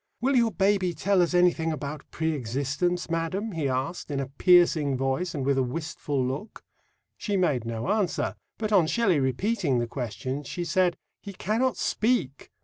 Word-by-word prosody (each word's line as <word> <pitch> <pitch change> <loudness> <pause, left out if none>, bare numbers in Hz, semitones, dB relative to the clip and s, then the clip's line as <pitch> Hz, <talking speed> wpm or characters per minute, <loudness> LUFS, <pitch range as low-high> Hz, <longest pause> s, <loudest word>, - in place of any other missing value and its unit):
"Will 265 +3 +1
your 235 -2 +4
baby 195 -3 +1
tell 190 +4 +2
us 175 +1 +1
anything 175 -2 +3
about 150 -1 -6
pre 160 -1 -1
existence, 140 +7 -1
madam?" 170 +6 -2
he 155 -6 -1
asked, 135 +8 -3
in 140 -2 -2
a 135 - -1
piercing 155 -2 +4
voice 135 +7 -1
and 135 -3 -2
with 140 -1 +2
a - - +4
wistful 140 0 -2
look. 140 - -5 0.6
She 205 -2 -1
made 140 -10 +1
no 115 -1 -4
answer, 200 -3 0 0.2
but 215 -1 -3
on 185 -6 +5
Shelley 195 -6 +2
repeating 140 - 0
the 120 - 0
question 130 +3 -4
she 175 +5 -5
said, 175 +1 +2 0.2
"He 200 - -8
cannot 225 +7 0
speak." 210 - 0
165 Hz, 170 wpm, -26 LUFS, 135-190 Hz, 0.6 s, on